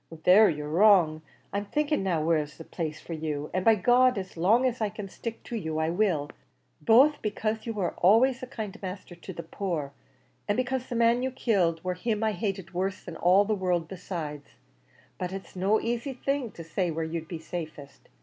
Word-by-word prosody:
"There 205 +4 +7
you're 150 -2 -3
wrong. 170 -2 +4 0.3
I'm 200 +1 -1
thinking 300 +6 0
now, 175 -5 0
where 165 0 +3
is 150 0 -6
the 165 - -8
best - - -27
place 155 -3 -3
for 170 - -8
you: 150 -2 -4
and 185 - 0
by 225 +2 +6
G 195 - -9
d 250 -2 +5
as 190 -1 -8
long 210 +10 +3
as 250 -2 -1
I 215 - +1
can 210 -1 -7
stick 230 +4 -7
to 240 - -6
you, 160 -8 -3
I 160 +1 +1
will; 175 -6 0 0.5
both 260 - +5
becase 215 +1 -2
you 230 - -2
were 195 -5 -1
always 240 +8 +4
a 255 - -6
kind 220 -5 -6
masther 185 -1 -7
to 175 +2 -9
the 170 -2 -7
poor, 165 -5 -4 0.5
an' 205 - +1
becase 255 0 -1
the 245 - -3
man 235 +1 +3
you 260 - 0
killed 185 -10 0
war 185 0 -1
him 215 +4 -2
I 220 - +2
hated 195 -4 -4
worse 185 +2 -2
than 170 - -8
all 185 +5 +4
the 215 - 0
world 180 -4 0
besides; 165 -5 -6 0.6
but 180 -1 -3
it's 195 0 -8
no 195 +4 +2
asy 240 +4 -2
thing 275 -1 -2
to 165 - -9
say 175 +3 -1
where 165 0 -2
you'd 160 0 -4
be 170 - -5
safest. 160 -4 -8
190 Hz, 215 wpm, -28 LUFS, 165-225 Hz, 0.6 s, There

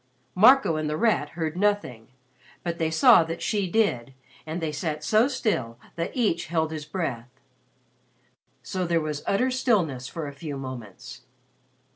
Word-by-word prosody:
Marco 225 - +5
and 155 -1 -2
The 150 - -2
Rat 215 -10 +1
heard 160 -1 -2
nothing, 185 - -1 0.6
but 170 -1 -3
they 160 -1 +1
saw 160 +1 +6
that 165 +1 -5
she 200 -4 0
did 135 - 0 0.3
and 160 +3 -3
they 160 -2 -2
sat 150 0 -4
so 215 +8 +3
still 130 - -2 0.2
that 170 0 -2
each 210 -11 0
held 160 -1 0
his 155 -2 -5
breath. 145 -8 -4 1.3
So 185 -2 -3
there 170 -1 +2
was 155 -2 -4
utter 250 +6 +1
stillness 185 - 0
for 160 +1 -5
a 140 - -7
few 145 0 -6
moments. 125 -2 -9
160 Hz, 155 wpm, -25 LUFS, 145-200 Hz, 1.3 s, saw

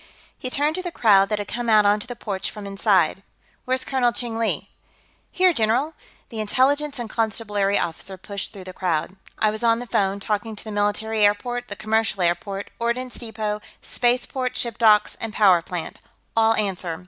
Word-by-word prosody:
He 255 - -6
turned 290 +4 +1
to - - -2
the 355 -1 -5
crowd 200 -8 +4
that 210 - 0
had 205 -1 -4
come 240 -1 -3
out 215 -2 +6
onto 205 +2 +2
the 245 - -6
porch 200 -5 -4
from 210 -2 -9
inside. 195 -2 +2 0.4
"Where's 260 0 0
Colonel 255 -3 +2
Cheng 235 -1 -3
Li?" 230 - -1 0.6
"Here, 370 -1 +4
general." 245 +5 +1 0.4
The 225 - -6
Intelligence 275 +7 +1
and 240 -2 -4
Constabulary 210 -3 0
officer 185 +3 -3
pushed 200 +2 -6
through 195 -3 -10
the 185 0 -9
crowd. 180 -1 -1 0.2
"I 215 - +2
was 215 +2 -4
on 230 -1 +4
the 245 - -5
phone, 200 -3 0
talking 215 +2 -2
to - - -9
the 215 - -7
military 210 +1 0
airport, 240 +4 +1
the 205 - -6
commercial 215 -2 0
airport, 195 +3 -1
ordnance 240 +2 -1
depot, 215 -2 -3 0.2
spaceport, 250 +1 0
ship 235 -2 -4
docks 215 -2 +4
and 225 -1 -4
power 190 -5 +5
plant. 175 0 -6 0.4
All 225 0 +4
answer. 185 -6 -2
215 Hz, 185 wpm, -23 LUFS, 200-240 Hz, 0.6 s, out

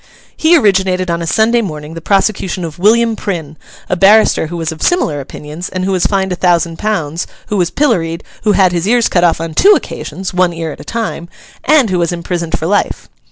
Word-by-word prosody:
He 330 +2 +4
originated 190 - +1
on 170 0 -2
a 165 - -4
Sunday 230 +6 +2
morning 155 -6 -6
the 165 - -7
prosecution 190 -2 0
of 160 0 -8
William 225 +3 +3
Prynne, 165 -8 -5 0.3
a - - 0
barrister 195 -2 +4
who 175 +2 -6
was 165 -1 -2
of 160 - -9
similar 165 - +1
opinions, 150 +5 -8
and 185 0 -3
who 195 - -1
was 185 -2 +1
fined 190 -2 -1
a - - 0
thousand 170 -2 +1
pounds; 170 -6 -2 0.2
who 210 - -1
was 175 -2 +1
pilloried; 175 - 0 0.2
who 210 -1 +2
had 190 -3 +3
his 175 +1 -1
ears 235 +1 +3
cut 175 - +1
off 170 -2 +3
on 165 -1 -5
two 405 - +6
occasions—one 185 -2 -2
ear 165 -1 -4
at - - -10
a - - -9
time—and 230 - -1
who 180 - +1
was 170 0 0
imprisoned 170 -1 -3
for 160 - -5
life. 205 +4 -1
180 Hz, 205 wpm, -14 LUFS, 165-210 Hz, 0.3 s, two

